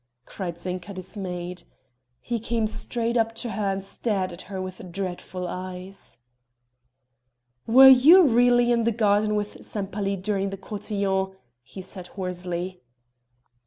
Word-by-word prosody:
cried 175 -4 -6
Zinka 180 +2 -5
dismayed. 180 -2 -5 0.6
He 235 -1 -2
came 230 0 -1
straight 235 +2 -1
up 225 0 +1
to 235 0 -4
her 200 -1 -1
and 195 0 -3
stared 195 -2 -2
at 170 - -8
her 195 -2 -4
with 185 -1 -7
dreadful 180 0 -4
eyes. 185 +2 -7 1.5
"Were 260 +4 +9
you 285 +9 +9
really 245 -2 +4
in 235 -1 +2
the 235 - +3
garden 210 -1 +2
with 210 0 -4
Sempaly 200 -1 -3
during 195 0 -1
the 195 - -6
cotillon?" 195 -1 -2 0.3
he 185 +10 -10
said 185 -1 -8
hoarsely. 180 -1 -4
195 Hz, 130 wpm, -25 LUFS, 185-225 Hz, 1.5 s, Were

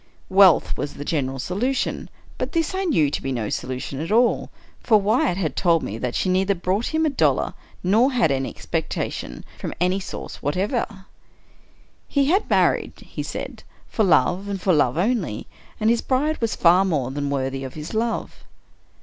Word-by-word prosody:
Wealth 190 -4 +5
was 145 - -4
the 145 - -7
general 135 -4 -1
solu 200 - -1
tion - - -2
— - - -24
but - - -3
this 330 +1 0
I 380 +1 -1
knew 160 - +2
to - - -2
be 135 - -3
no 115 -5 -2
solution 130 +1 -4
at 165 +5 -4
all; 240 +3 +3 0.3
for 215 -3 +4
Wyatt 200 -3 +1
had 160 -8 -2
told 170 -3 +2
me 110 +3 -5
that 125 -1 -3
she - - 0
neither 190 +2 +2
brought 190 +6 -1
him 320 0 +1
a - - +3
dollar 275 - +1 0.3
nor 220 +9 +4
had 240 - +2
any 135 -1 -1
expectations 60 - -4
from - - -5
any 180 +2 +2
source 190 - -7
whatever. 190 - -2 0.5
" - - -34
He 280 -1 +4
had 390 +4 +1
married," - - +2
he - - -7
said, - - -6 0.3
"for 220 - +1
love, 185 +1 +3
and 200 -1 -3
for 185 0 +2
love 145 -3 +2
only; 185 - 0 0.3
and 220 +1 +3
his 235 - +1
bride 290 +4 0
was 230 -2 0
far 180 +2 +5
more 145 -9 -1
than 145 +1 -2
worthy 135 -1 -2
of 130 - -7
his 155 +5 -7
love." 225 +1 -2
185 Hz, 190 wpm, -23 LUFS, 145-225 Hz, 0.5 s, Wealth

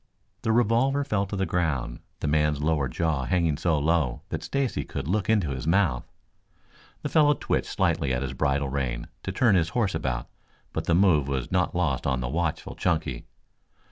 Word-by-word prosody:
The 110 - 0
revolver 120 +5 +3
fell 100 -6 -1
to 100 - -4
the 95 0 0
ground, 80 -9 -1 0.2
the - - -1
man's 75 -1 +2
lower 75 -2 +1
jaw 75 -2 -1
hanging 85 +1 +1
so 80 +1 +1
low 75 -4 +1
that - - -3
Stacy 140 -3 -1
could 70 -1 -5
look 100 +4 0
into 100 -10 +2
his 65 +2 -4
mouth. 85 -8 +1 0.9
The - - -2
fellow 150 -2 +4
twitched - - -1
slightly 70 - +1
at 65 +1 0
his 70 - -4
bridle 70 -1 0
rein 65 -3 -3
to - - -4
turn 120 -5 +3
his 85 -3 +3
horse 105 -6 +1
about, 65 -6 -2 0.5
but - - -3
the 85 - +2
move 85 -7 +4
was 65 -3 -3
not 90 -2 +1
lost 80 -8 0
on 65 -2 +1
the 60 0 -3
watchful 85 +1 -2
Chunky. 60 -2 -1
80 Hz, 185 wpm, -26 LUFS, 70-95 Hz, 0.9 s, fellow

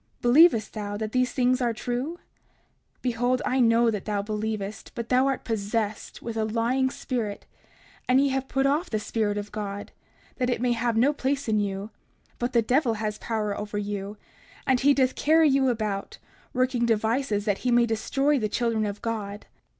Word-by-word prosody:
Believest 245 -3 +5
thou 205 -1 -4
that 215 0 -4
these 255 +1 +1
things 255 0 +2
are 240 -2 +1
true? 245 +7 -3 0.8
30:42 - - -40
Behold, 245 +1 +1
I 260 - +1
know 230 -1 +4
that 210 -3 -4
thou 205 -2 -1
believest, 215 -1 -4
but 235 -1 -5
thou 255 +1 +4
art 270 -2 -1
possessed 215 -1 -3
with 230 -1 -5
a 220 - 0
lying 235 +4 +1
spirit, 235 -6 -4 0.6
and 255 +1 +5
ye 280 0 +3
have 265 0 -1
put 270 0 0
off 295 +6 +1
the 215 - 0
Spirit 210 -1 -1
of 205 0 -5
God 205 -1 -5 0.5
that 255 -2 0
it 245 - 0
may 245 0 +1
have 235 -1 0
no 270 +6 +4
place 280 -1 -1
in 215 -1 +2
you; 200 +1 -3 0.5
but 245 +1 -1
the 235 -2 +4
devil 245 0 +2
has 215 -1 -3
power 215 -3 -2
over 210 0 -5
you, 205 0 -4 0.5
and 260 -1 +3
he 280 +2 +4
doth 260 -2 +2
carry 320 +1 +4
you 270 -2 +3
about, 215 -4 -3 0.3
working 250 -2 +1
devices 220 -1 0
that 205 -3 0
he 255 - -1
may 240 0 +5
destroy 270 +6 +1
the 215 -2 -1
children 225 -1 0
of 205 0 -6
God. 210 -3 -4
230 Hz, 190 wpm, -26 LUFS, 210-255 Hz, 0.8 s, Believest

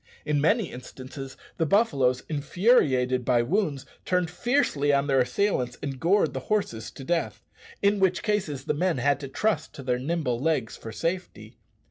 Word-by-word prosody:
In 150 -1 +1
many 205 +5 +2
instances 130 +2 -9 0.2
the 165 - +1
buffaloes, 140 - +2
infuriated 145 - +2
by 120 -1 +3
wounds, 150 - -1 0.2
turned 180 -2 0
fiercely 180 - +1
on 140 0 +2
their 135 -2 +2
assailants 125 -1 0
and 135 -2 -4
gored 190 +7 +2
the - - -2
horses 150 - -1
to 135 - -11
death, 120 -9 -2 0.4
in 200 0 +3
which 190 -1 +2
cases 185 - -1
the - - +1
men 175 +1 0
had 140 +3 +2
to 140 - -6
trust 210 +10 -1
to 140 - -8
their 125 -1 0
nimble 140 -4 -1
legs 140 -5 0
for 110 - -8
safety. 175 +10 -4
145 Hz, 165 wpm, -26 LUFS, 130-185 Hz, 0.4 s, by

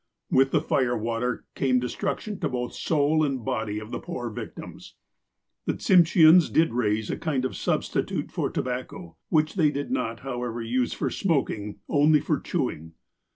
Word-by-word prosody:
With 135 +1 +4
the 150 - +2
fire 130 -6 +1
water 115 +2 -2
came 130 -2 +2
destruction 195 - -3
to - - -1
both 125 -1 -3
soul 155 0 +1
and 135 -5 -2
body 110 -5 -2
of 110 +2 -7
the - - -3
poor 125 -9 -5
victims. - - -9 0.7
The - - +1
Tsimsheans 170 -2 +6
did 160 -7 +3
raise 110 -2 0
a - - -3
kind 140 -6 -1
of 130 - -3
substitute - - -1
for - - -1
to - - -2
bacco, 130 +8 -6
which 155 -1 +2
they 160 -6 +3
did 145 - -4
not, 115 - -2
however, 125 -3 -4
use 120 +2 -1
for - - -2
smoking, 120 - -1
only 150 +1 +4
for 150 0 -1
chewing. 80 - -3
130 Hz, 165 wpm, -26 LUFS, 120-155 Hz, 0.7 s, Tsimsheans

